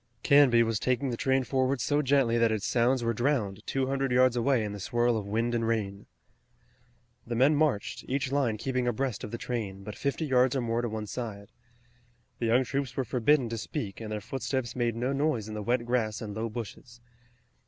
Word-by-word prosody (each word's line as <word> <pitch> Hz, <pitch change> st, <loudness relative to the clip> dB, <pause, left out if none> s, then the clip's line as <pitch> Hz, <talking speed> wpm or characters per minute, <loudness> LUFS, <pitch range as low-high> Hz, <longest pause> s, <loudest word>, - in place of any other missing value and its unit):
Canby 135 Hz, -5 st, +6 dB
was 115 Hz, -2 st, -1 dB
taking 130 Hz, +1 st, 0 dB
the -, -, -1 dB
train 130 Hz, +2 st, +1 dB
forward 130 Hz, +1 st, 0 dB
so 145 Hz, +5 st, +1 dB
gently 135 Hz, -4 st, +2 dB
that 115 Hz, -1 st, +3 dB
its 105 Hz, -2 st, -1 dB
sounds 120 Hz, +2 st, +2 dB
were 115 Hz, 0 st, +1 dB
drowned 115 Hz, -5 st, 0 dB
two 135 Hz, -1 st, 0 dB
hundred 135 Hz, 0 st, -1 dB
yards 125 Hz, 0 st, +4 dB
away 120 Hz, 0 st, +2 dB
in 105 Hz, -, -3 dB
the 105 Hz, -, -7 dB
swirl 120 Hz, +4 st, +1 dB
of 105 Hz, -2 st, -3 dB
wind 115 Hz, +3 st, 0 dB
and 115 Hz, -1 st, 0 dB
rain. 105 Hz, -3 st, -2 dB, 1.2 s
The 120 Hz, -, -2 dB
men 135 Hz, +6 st, +4 dB
marched, 145 Hz, -9 st, 0 dB
each 135 Hz, +1 st, -1 dB
line 130 Hz, -6 st, +1 dB
keeping 130 Hz, +1 st, -1 dB
abreast 120 Hz, -1 st, -1 dB
of -, -, -5 dB
the 115 Hz, -, -5 dB
train, 105 Hz, -6 st, -4 dB
but 105 Hz, +1 st, -6 dB
fifty 140 Hz, +6 st, -2 dB
yards 130 Hz, -2 st, +3 dB
or 135 Hz, -, +1 dB
more 115 Hz, 0 st, 0 dB
to 120 Hz, -, -2 dB
one 110 Hz, 0 st, -4 dB
side. 105 Hz, -3 st, -6 dB, 0.9 s
The 115 Hz, -, 0 dB
young 120 Hz, +3 st, +4 dB
troops 135 Hz, -1 st, -3 dB
were 135 Hz, -, 0 dB
forbidden 125 Hz, +3 st, +2 dB
to 115 Hz, 0 st, -3 dB
speak 110 Hz, -4 st, -5 dB
and 110 Hz, -1 st, -6 dB
their 105 Hz, -1 st, -3 dB
footsteps 130 Hz, +2 st, -3 dB
made 120 Hz, -2 st, 0 dB
no 125 Hz, +4 st, -1 dB
noise 140 Hz, -7 st, 0 dB
in 110 Hz, -, -6 dB
the 105 Hz, -, -4 dB
wet 120 Hz, +3 st, 0 dB
grass 110 Hz, -3 st, 0 dB
and 105 Hz, -2 st, -6 dB
low 110 Hz, +2 st, -3 dB
bushes. 120 Hz, +2 st, -8 dB
120 Hz, 210 wpm, -29 LUFS, 110-130 Hz, 1.2 s, Canby